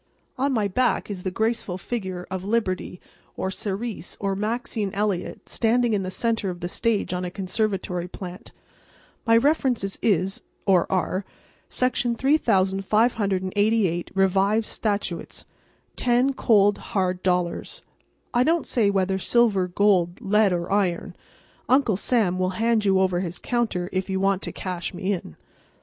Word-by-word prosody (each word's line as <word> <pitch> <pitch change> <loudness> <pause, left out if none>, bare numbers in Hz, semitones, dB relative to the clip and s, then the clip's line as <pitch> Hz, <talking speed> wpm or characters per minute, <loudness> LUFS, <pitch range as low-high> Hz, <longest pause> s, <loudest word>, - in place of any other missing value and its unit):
On 275 +2 0
my 220 -5 +1
back 245 +1 0
is 190 -3 -5
the 185 - -2
graceful 220 -2 -1
figure 185 -3 -4
of 190 -1 -3
Liberty 195 -4 -1 0.4
or 190 - -2
Ceres 205 0 -4
or 195 -1 -1
Maxine 215 0 -2
Elliot 205 -3 -2
standing 235 0 +2
in 205 - +1
the 185 - -3
centre 225 0 0
of 175 -1 -6
the 175 - -2
stage 210 +1 0
on 180 0 -2
a 180 - -2
conservatory 185 -2 -2
plant. 180 0 -9 0.8
My 230 0 +6
references 250 -7 +1
is—or 190 -1 +1
are—Section 235 +6 -2
3,588, 205 - +1
Revised 195 +3 +2
Statutes. 205 -6 -3 0.5
Ten 250 +2 +2
cold, 205 -5 +3
hard 185 -2 -1
dollars—I 180 - -3
don't 325 +4 +2
say 220 -5 +2
whether 190 -1 +1
silver, 210 -4 +2
gold, 180 -2 +2
lead 210 -2 +3
or 175 0 -2
iron—Uncle 205 +5 -1
Sam 200 -5 +1
will 185 0 +1
hand 225 -1 +2
you 190 -1 +4
over 185 -2 +2
his 180 -1 -4
counter 225 -8 -1
if 190 +1 -2
you 190 0 0
want 195 0 +1
to - - -4
cash 180 -1 -5
me 190 +2 -1
in. 170 - -6
195 Hz, 135 wpm, -24 LUFS, 185-230 Hz, 0.8 s, My